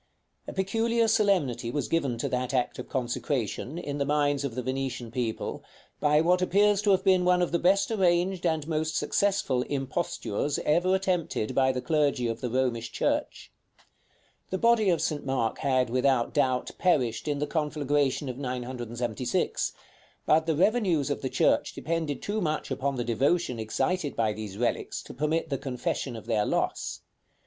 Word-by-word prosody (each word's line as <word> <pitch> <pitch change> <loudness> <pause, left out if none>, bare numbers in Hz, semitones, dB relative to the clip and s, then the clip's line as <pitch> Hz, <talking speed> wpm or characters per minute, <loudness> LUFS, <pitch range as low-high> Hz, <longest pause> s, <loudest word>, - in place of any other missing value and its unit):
A - - -5
peculiar 225 +4 +1
solemnity 185 - +2
was 145 +4 -2
given 140 -8 0
to 115 - -2
that 125 +1 -1
act 125 -1 0
of - - -7
consecration, 130 - -2
in 145 -4 -4
the - - +2
minds 145 -1 +1
of 135 -5 -3
the 125 - -3
Venetian 130 -2 -3
people, 120 -2 -3 0.4
by 150 +1 +4
what 180 +2 +3
appears 200 +2 +3
to 210 - +1
have 190 -1 +4
been 185 -2 +4
one 180 0 +4
of 175 - 0
the 170 - +1
best 195 +5 +3
arranged 180 -2 +2
and 160 -3 0
most 160 0 -1
successful 195 -11 +1
impostures 135 -1 -2
ever 175 +5 +3
attempted 180 - -1
by 130 -1 +3
the 125 -1 -4
clergy 145 -6 +1
of 115 0 -3
the 125 - -2
Romish 120 -2 -1
church. - - -2 1.0
The 190 - -1
body 230 -1 +4
of 165 -3 +2
St. 150 -3 -1
Mark 130 -4 -1
had, 130 -3 +1
without 130 -1 +2
doubt, 130 -1 +1
perished 125 -10 +1
in 145 -1 0
the 145 - -1
conflagration 145 -3 0
of 130 0 -5
976; 120 -2 -2 0.5
but 160 +1 +3
the 160 - +2
revenues 185 - +2
of - - -2
the - - -2
church - - +2
depended 160 -3 -2
too 210 +1 -1
much 155 -4 -2
upon 135 +1 -1
the 120 - -1
devotion 125 +3 +1
excited 140 +8 -1
by 110 -2 +1
these 105 -2 -7
relics 120 +1 -2
to - - -10
permit 155 +4 -1
the 135 - -1
confession 130 -1 -3
of 110 - -9
their 110 -3 +1
loss. - - -1
145 Hz, 170 wpm, -28 LUFS, 125-175 Hz, 1.0 s, by